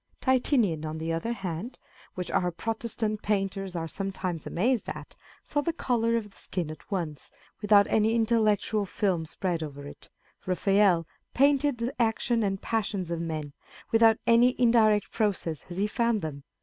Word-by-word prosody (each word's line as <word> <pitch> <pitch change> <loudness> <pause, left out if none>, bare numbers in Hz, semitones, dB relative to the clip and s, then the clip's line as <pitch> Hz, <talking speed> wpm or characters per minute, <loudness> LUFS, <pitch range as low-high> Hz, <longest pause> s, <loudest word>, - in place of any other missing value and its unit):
Titian, 245 - +2
on 155 0 -4
the 165 +1 -2
other 165 +8 -2
hand 195 +3 -5 0.4
(which 180 -1 -4
our 180 - +1
Protestant 215 +3 -3
painters 195 -2 -1
are 165 -1 -2
sometimes 185 -1 -4
amazed 230 +6 0
at), - - -8 0.3
saw 290 - -1
the 335 - 0
colour 230 -6 +1
of 210 -3 -5
the - - -22
skin 170 -5 -4
at 155 - -12
once, 170 -8 -4 0.3
without 205 -1 +6
any 220 +2 +2
intellectual 215 -2 +2
film 185 -5 -1
spread 175 0 -2
over 145 -2 -7
it; 145 - -12 0.4
Raphael 190 -2 +3 0.3
painted 280 0 +3
the 235 +3 -2
actions 230 0 +1
and 195 -1 -1
passions 200 -6 -2
of 170 -1 -2
men, 155 -3 -4 0.4
without 225 -1 +5
any 240 +2 +4
indirect 220 -4 +4
process, 190 -8 -1
as 175 - -7
he 200 - +2
found 230 0 0
them. 140 -3 -6
205 Hz, 160 wpm, -28 LUFS, 170-230 Hz, 0.4 s, without